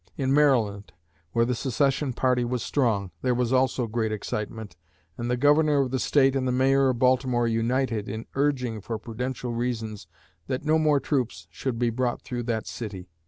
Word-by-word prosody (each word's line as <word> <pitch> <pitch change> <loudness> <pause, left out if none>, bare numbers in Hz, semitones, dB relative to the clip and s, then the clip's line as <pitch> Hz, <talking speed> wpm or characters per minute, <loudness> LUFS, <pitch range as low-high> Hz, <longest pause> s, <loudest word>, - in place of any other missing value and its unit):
In 135 -1 +1
Maryland, 115 -9 +2 0.4
where 115 +4 +2
the 125 - 0
secession 135 +3 0
party 125 0 +1
was 120 0 -2
strong, 110 -9 0
there 125 -1 +1
was 125 0 0
also 130 -1 +2
great 110 -1 -1
excitement, 105 -1 -5 0.4
and 120 0 -4
the 125 - +1
Governor 145 +2 +4
of 130 -2 -1
the 130 - 0
State 135 0 +3
and 130 -1 0
the - - +1
Mayor 135 +1 +3
of 125 - 0
Baltimore 125 -1 +2
united 115 -1 0
in 110 +2 -5
urging, 130 -6 0
for 110 +3 -4
prudential 120 +2 -4
reasons, 110 -5 -3 0.4
that 130 +3 -3
no 155 +1 +3
more 150 -2 +3
troops 125 - -2
should 120 +8 -3
be 120 0 +1
brought 120 +1 -1
through 125 -2 -4
that 115 -2 -2
city." 95 -6 -7
125 Hz, 180 wpm, -26 LUFS, 115-135 Hz, 0.4 s, Governor